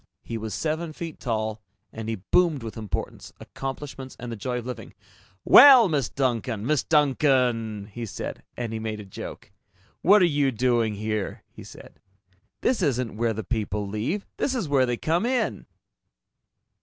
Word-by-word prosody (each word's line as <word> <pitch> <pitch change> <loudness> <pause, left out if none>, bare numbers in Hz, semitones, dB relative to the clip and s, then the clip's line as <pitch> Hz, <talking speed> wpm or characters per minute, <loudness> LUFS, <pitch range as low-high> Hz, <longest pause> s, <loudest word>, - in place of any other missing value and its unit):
He 115 - -6
was 110 -1 -4
seven 160 +1 -2
feet 165 0 -7
tall, 110 -3 -2 0.3
and 110 0 -6
he 115 - -1
boomed 145 - +1
with 115 - -6
importance, 110 -3 -5
accomplishments, 135 -1 -7
and 120 0 -6
the - - -4
joy 125 +4 -3
of 120 - -5
living. 125 -3 -7 0.5
"Well, 255 -5 +9
Miss 140 -6 0
Duncan! 120 -5 -1
Miss 150 +1 +2
Duncan!" 125 -8 +2
he 115 +3 -7
said, - - -6 0.2
and 115 -2 -3
he 110 - -3
made 110 -1 -4
a 105 - -8
joke. 95 - -9 0.5
"What 200 +1 +6
are - - +7
you 145 -4 +2
doing 120 -2 +1
here?" 110 -1 -3
he - - -12
said. - - -14 0.6
"This 245 -5 +1
isn't 125 - 0
where 115 +1 0
the 110 +1 -5
people 105 -1 -2
leave. 115 - -2
This 265 - 0
is 230 -10 -2
where 135 -3 +3
they 120 -1 -1
come 165 - 0
in!" 250 +1 -1
125 Hz, 170 wpm, -25 LUFS, 110-150 Hz, 0.6 s, Well